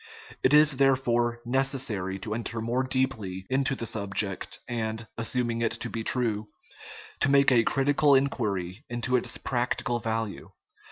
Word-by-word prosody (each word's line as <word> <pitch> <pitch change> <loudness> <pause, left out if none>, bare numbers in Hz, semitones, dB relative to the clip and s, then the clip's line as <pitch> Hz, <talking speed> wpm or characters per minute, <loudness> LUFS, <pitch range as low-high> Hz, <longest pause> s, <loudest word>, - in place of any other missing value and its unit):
It 130 - +3
is, 150 -2 +6
therefore, 120 -3 +2
necessary 120 -7 0
to 105 +1 -4
enter 115 0 -4
more 115 +3 0
deeply 130 -8 -2
into 135 0 +1
the 115 - -4
sub 100 -3 -5
ject, 95 -3 0
and 110 -1 -3
assuming 115 0 -1
it 115 -1 +1
to 115 0 -4
be 115 - -4
true 110 -4 0 0.7
to 145 - +2
make 140 0 +5
a 120 -2 +5
critical 140 +3 +3
inquiry 105 -7 -1
into 120 +1 -1
its 125 - 0
practical 120 -1 -1
value. 110 -2 -3
120 Hz, 150 wpm, -27 LUFS, 110-130 Hz, 0.7 s, is